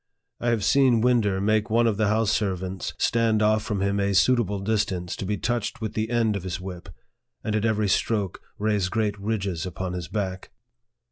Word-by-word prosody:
I 120 - 0
have 115 -3 +1
seen 130 -3 +4
Winder 115 -6 +2
make 110 +2 +1
one 115 +2 +3
of 110 -3 +1
the 110 -1 +2
house 110 0 +2
servants 95 -3 -2
stand 115 -2 +2
off 110 0 +3
from 105 -2 -3
him 100 +1 +1
a 100 0 +1
suitable 105 0 +3
distance 95 -4 -1
to 95 - -4
be 105 +1 -1
touched 120 0 -2
with 110 -2 -4
the 110 0 -2
end 115 -3 +1
of 100 - -3
his 90 0 -4
whip, 90 -1 -8 0.5
and 110 - -1
at 110 0 0
every 110 -2 +1
stroke 100 -1 0 0.2
raise 105 -3 0
great 105 0 0
ridges 100 -5 -2
upon 95 0 -4
his 90 -2 -4
back. 95 -3 -4
105 Hz, 195 wpm, -25 LUFS, 95-110 Hz, 0.5 s, seen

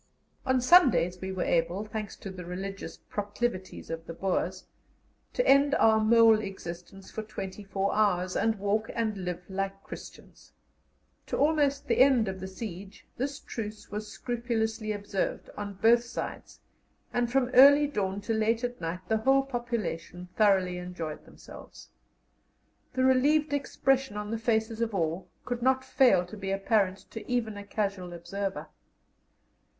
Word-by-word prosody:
On 260 0 +3
Sundays 250 - +5
we 190 0 -4
were 185 -1 -2
able, 175 +5 0
thanks 215 -1 -5
to 195 - -8
the 185 -1 -8
religious 190 +3 -6
proclivities 205 -3 -4
of 165 0 -6
the 165 - -6
Boers, 190 +1 -2 0.7
to - - 0
end 280 +1 +5
our 220 -1 +5
mole 225 0 +6
existence 195 -1 -8
for 220 - -4
twenty 210 -2 -7
four 195 0 -1
hours, 185 -4 +1
and 225 +1 +1
walk 205 +2 0
and 220 -2 0
live 180 -2 -4
like 195 0 -4
Christians. - - -12 0.7
To - - -2
almost 290 -2 +2
the 235 - +1
end 255 -4 +5
of 190 0 -4
the 190 - -5
siege 190 0 -8
this 275 +2 -3
truce 215 -2 -7
was 210 +1 -4
scrupulously 225 -3 -2
observed 205 -2 -3
on 205 -1 -5
both 230 +4 +4
sides, 240 - -7 0.5
and 240 -1 0
from 255 -1 +2
early 285 +3 +8
dawn 200 -8 -2
to 225 +3 -2
late 225 +2 +1
at 245 -3 -3
night 165 +2 -3
the 220 - +2
whole 270 +5 +3
population 225 -9 -4
thoroughly 190 -4 +3
enjoyed 180 -4 -6
themselves. - - -13 1.0
The 260 - +1
relieved 285 +4 +3
expression 270 -4 0
on 210 0 -4
the 225 - -2
faces 225 0 0
of 225 -3 -1
all 165 0 -2 0.2
could 245 -1 -3
not 260 +1 +2
fail 245 -10 +4
to 180 - -10
be 195 -1 -5
apparent 195 -1 +1
to 225 - -7
even 225 -4 0
a 205 - -7
casual 200 -4 -3
observer. 190 +3 -4
215 Hz, 155 wpm, -29 LUFS, 190-240 Hz, 1.0 s, early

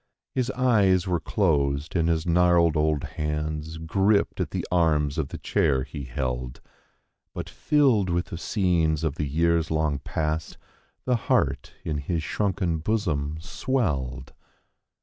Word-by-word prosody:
His 130 -1 0
eyes 105 -9 +3
were 90 -3 0
closed 75 -5 0
and 85 -1 +2
his 80 -1 0
gnarled 85 -1 +4
old 75 -1 +1
hands 75 0 -3
gripped 95 +6 +1
at - - -1
the - - -3
arms 75 -4 +2
of 75 - -1
the - - -7
chair 65 -2 +1
he 70 +1 -7
held. 60 0 -3 0.8
But - - -4
filled 130 -11 +2
with 85 0 0
the - - -3
scenes 85 -6 +1
of 80 -4 0
the 75 - -1
years 85 +2 +1
long 80 -3 0
past, 75 +2 -3 0.5
the 125 -1 +2
heart - - +1
in 75 -2 -2
his 80 +2 -2
shrunken 90 -2 -1
bosom 80 -7 -1
swelled. 70 - -2
80 Hz, 140 wpm, -25 LUFS, 75-90 Hz, 0.8 s, gnarled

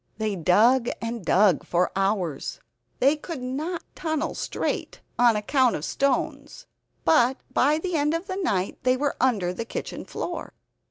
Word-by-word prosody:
They 215 -2 -1
dug 225 +9 +4
and 230 -2 -4
dug 185 0 +4
for 175 +1 +1
hours. 195 -7 -1 0.4
They 275 +4 +4
could 305 -3 -7
not 305 +7 -3
tunnel 315 -3 -2
straight - - -3 0.2
on 240 -2 +5
account 250 +4 +2
of 150 - -4
stones; 280 - -1 0.4
but 265 -4 +4 0.2
by 295 +4 +3
the 360 +2 -3
end 300 +1 +2
of 335 +3 -3
the 375 0 -4
night 200 - -1
they 255 +1 +2
were 285 +1 -1
under 205 -9 +2
the 230 - -4
kitchen 230 - -6
floor. 345 -2 -5
255 Hz, 155 wpm, -25 LUFS, 205-300 Hz, 0.4 s, on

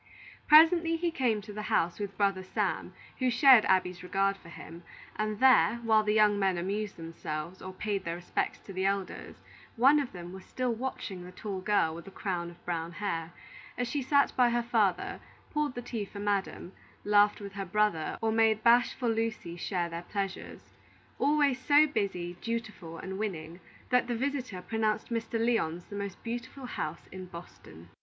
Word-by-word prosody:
Presently 330 +2 +7
he 340 +1 -1
came 240 -8 0
to 210 +1 -10
the 210 - -5
house 175 -4 0
with 200 -1 -5
brother 195 -2 +1
Sam, 185 - -2 0.3
who 255 -1 +2
shared 250 -2 +7
Abby's 180 -1 +1
regard 195 +2 +1
for 185 -3 -15
him; 170 0 -10 0.3
and 215 -1 -2
there, 260 -3 +6
while 220 -1 +4
the 210 0 0
young 210 -1 +4
men 190 -2 +2
amused 200 +4 -3
themselves, 165 +1 -6
or 185 - -6
paid 200 +1 -3
their 170 -1 -3
respects 175 0 -2
to 195 - -10
the 185 +1 -2
elders, 195 -1 -2 0.4
one 270 +5 +6
of 275 -4 -3
them 175 -1 -8
was 190 0 -9
still 250 -2 -2
watching 225 -6 -5
the 180 - -10
tall 190 0 -5
girl 185 -5 +2
with 170 +1 -9
the - - -9
crown 180 -3 -3
of 175 - -17
brown 170 -1 -3
hair, 170 -4 -3 0.5
as 245 - -1
she 285 +4 -2
sat 280 +2 +2
by 250 -1 +5
her 240 0 0
father, 215 -6 +1 0.3
poured 300 -3 -1
the 245 - -5
tea 230 -3 -4
for 200 - -10
Madam, 200 -3 -2 0.3
laughed 205 0 +4
with 200 -1 -8
her 200 -1 -4
brother, 195 -4 0
or 220 - +2
made 220 -1 +3
bashful 240 +1 +4
Lucy 225 -6 -2
share 175 0 -2
their 170 0 -5
pleasures; 195 +1 -5 0.5
always 285 -2 +3
so 290 +3 +5
busy, 195 - -2
dutiful, 220 -8 -5
and 190 +1 -6
winning, 170 -5 -4 0.3
that 250 -1 +3
the 240 - -1
visitor 255 -7 -3
pronounced 220 -1 -1
Mr. 230 0 -3
Lyon's 200 -8 0
the 205 - -9
most 200 -2 -5
delightful 245 +3 -6
house 155 -9 -5
in 185 0 -8
Boston. 85 - -12
205 Hz, 180 wpm, -30 LUFS, 180-235 Hz, 0.5 s, Presently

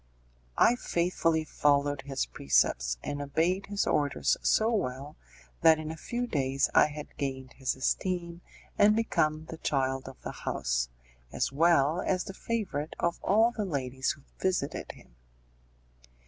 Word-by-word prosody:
I 240 - +5
faithfully 170 -5 0
followed 145 -2 +1
his 135 - -2
precepts, - - +1
and 145 0 -3
obeyed 165 +7 0
his 205 -1 -1
orders 145 -1 +1
so 220 +2 +3
well, 140 - -3 0.5
that 160 -1 +7
in 155 0 -5
a - - -6
few 240 +9 -3
days 135 - 0
I - - +6
had 150 0 -9
gained 130 -2 -4
his 130 -1 -2
esteem, 170 +5 -2 0.4
and 210 +1 +6
become 155 -9 0
the 160 - -8
child 135 -1 -1
of 135 - -14
the - - -4
house, - - -2 0.4
as - - -1
well 160 +2 +3
as 185 -1 0
the 195 - -8
favourite 190 -9 -3
of 170 0 0
all 220 +4 +4
the 220 -3 -3
ladies 135 -7 -2
who 140 - -19 0.2
visited 180 -7 -1
him. - - -19
150 Hz, 145 wpm, -29 LUFS, 135-180 Hz, 0.5 s, that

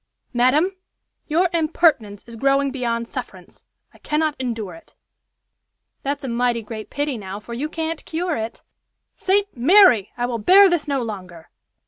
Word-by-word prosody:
"Madam, 260 +9 +3 0.6
your 335 +4 +2
impertinence 310 - +1
is 235 - -11
growing 275 +3 +1
beyond 235 -3 -2
sufferance. - - -9 0.3
I - - -20
cannot 305 0 -1
endure 225 -7 -4
it." 165 - -16 1.1
"That's 280 +1 -3
a - - -4
mighty 240 -1 0
great 215 0 -8
pity, 285 -4 -2
now, 195 0 -7
for 225 +3 -10
you 280 +6 -3
can't 325 0 -4
cure 340 +1 -2
it." 225 0 -5 0.5
"St. 400 +1 0
Mary! 260 - +5
I 245 - 0
will 240 -2 -3
bear 380 - +6
this 335 -3 0
no 275 -3 0
longer." 185 -7 -8
260 Hz, 150 wpm, -21 LUFS, 230-315 Hz, 1.1 s, bear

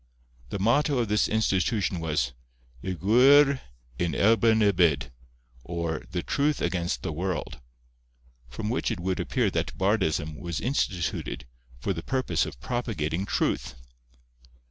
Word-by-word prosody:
The - - -3
motto 130 +8 +2
of 115 -4 0
this 105 0 +3
institution 100 -2 +1
was—'Y 60 -1 -4
Gwir 130 - +5 0.4
yn 85 -1 0
erbyn 110 0 +4
y 100 - +5
byd,' 70 -8 +2 0.5
or 85 -2 -3
The 90 -1 -3
Truth 145 0 0
against 85 0 -1
the - - -2
world; 90 +3 -3 0.9
from 105 - -4
which 125 - 0
it 115 -6 -3
would 90 +1 -2
appear - - 0
that - - -2
bardism 80 -6 0
was 85 -3 -4
instituted 100 - -2 0.3
for 95 +10 -1
the 80 - -5
purpose 130 -8 0
of - - -9
propagating 100 - -2
truth. - - -1
95 Hz, 130 wpm, -27 LUFS, 80-115 Hz, 0.9 s, Gwir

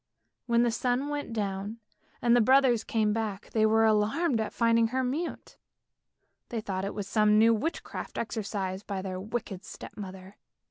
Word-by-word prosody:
When 235 0 +4
the 240 - +2
sun 250 +4 0
went 290 -4 -3
down 205 0 -3 0.5
and 240 0 +5
the 245 - +5
brothers 255 -1 +4
came 215 -2 +1
back, 215 -3 -3
they 220 -1 +3
were 225 +1 +4
alarmed 220 +5 +2
at 220 - -3
finding 230 -1 +3
her 260 +3 -1
mute; 290 +7 -4 0.9
they 235 - -2
thought 195 -3 -3
it 200 - -4
was 205 -2 -4
some 210 0 +4
new 225 +1 +6
witchcraft 295 +10 -4
exercised 200 -4 -3
by 195 -2 -3
their 185 -1 -4
wicked 200 -2 -5
step - - -10
mother. 190 -1 -9
220 Hz, 170 wpm, -29 LUFS, 200-240 Hz, 0.9 s, new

